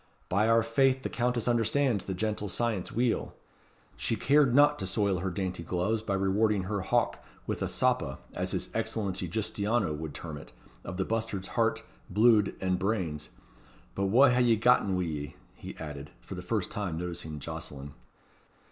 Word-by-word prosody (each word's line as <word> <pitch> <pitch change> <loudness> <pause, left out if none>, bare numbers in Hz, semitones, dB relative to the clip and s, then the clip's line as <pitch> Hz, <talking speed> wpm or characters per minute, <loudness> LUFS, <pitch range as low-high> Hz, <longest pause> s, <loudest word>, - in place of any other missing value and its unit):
By 100 +4 +2
our 115 0 +5
faith 130 +3 +2
the - - -2
Countess 120 -1 0
understands 120 -1 +2
the 95 - -3
gentle 105 +1 -2
science 110 -2 -1
weel. 120 0 0 0.6
She 115 - 0
cared 135 +2 +4
not 145 +1 +5
to 95 - -2
soil 100 -1 +1
her 95 +2 -2
dainty 90 -1 -3
gloves 90 +6 -1
by 100 -3 -1
rewarding 100 +1 +2
her 100 +1 -2
hawk 120 +5 0 0.2
with - - -3
a - - 0
soppa, 65 0 0 0.2
as - - -2
his - - -3
Excellency 95 -4 -2
Giustiniano 105 0 0
would 75 -1 -6
term 80 -3 -6
it, - - -14 0.3
of 90 - -6
the 95 - 0
bustard's 110 -4 -2
heart, - - +1 0.3
bluid, 110 0 +4
and 95 -1 0
brains. 90 -8 -2 0.6
But 100 0 0
wha 130 +7 +6
hae 125 0 +3
ye 120 -2 +5
gotten 110 -4 +3
wi' 90 - 0
ye?" 75 -4 -4 0.2
he - - -10
added, 75 -2 -7
for - - -9
the - - -5
first - - -2
time 95 -6 -3
noticing 85 -3 -5
Jocelyn. 70 -1 -7
100 Hz, 175 wpm, -29 LUFS, 90-115 Hz, 0.6 s, wha